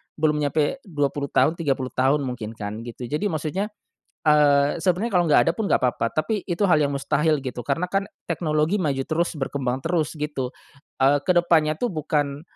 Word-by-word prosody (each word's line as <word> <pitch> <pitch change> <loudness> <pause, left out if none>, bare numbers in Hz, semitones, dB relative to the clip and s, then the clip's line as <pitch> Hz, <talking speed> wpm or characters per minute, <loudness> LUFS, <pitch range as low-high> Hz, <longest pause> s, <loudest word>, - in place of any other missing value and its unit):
belum 150 -1 +1
nyampe 150 - 0
20 145 -3 -1
tahun, 160 +4 +2
30 135 -5 -1
tahun 135 +3 +2
mungkin 115 -3 -5
kan, 105 0 -5
gitu 120 +1 -8
jadi 150 +8 -1
maksudnya 165 +3 -2 0.6
eee, 145 0 +4
sebenernya 190 +6 +1
kalo 175 - +2
enggak 150 - +6
ada - - +4
pun 220 0 -2
enggak - - +2
papa, 120 -2 +1
tapi 205 +6 -1
itu 175 +2 -1
hal 175 -5 +4
yang 140 -1 +1
mustahil 150 +2 +1
gitu, 125 -2 -5
karena 145 +7 -1
kan 195 0 0 0.2
teknologi 155 +4 0
maju 140 -5 0
terus 170 +2 -1
berkembang 135 -2 -2
terus 165 -2 0
gitu, 145 -4 -3 0.5
eee, 140 +2 +5
kedepannya 170 -4 +3
tuh 245 - -1
bukan 145 -3 -1
150 Hz, 175 wpm, -23 LUFS, 140-170 Hz, 0.6 s, enggak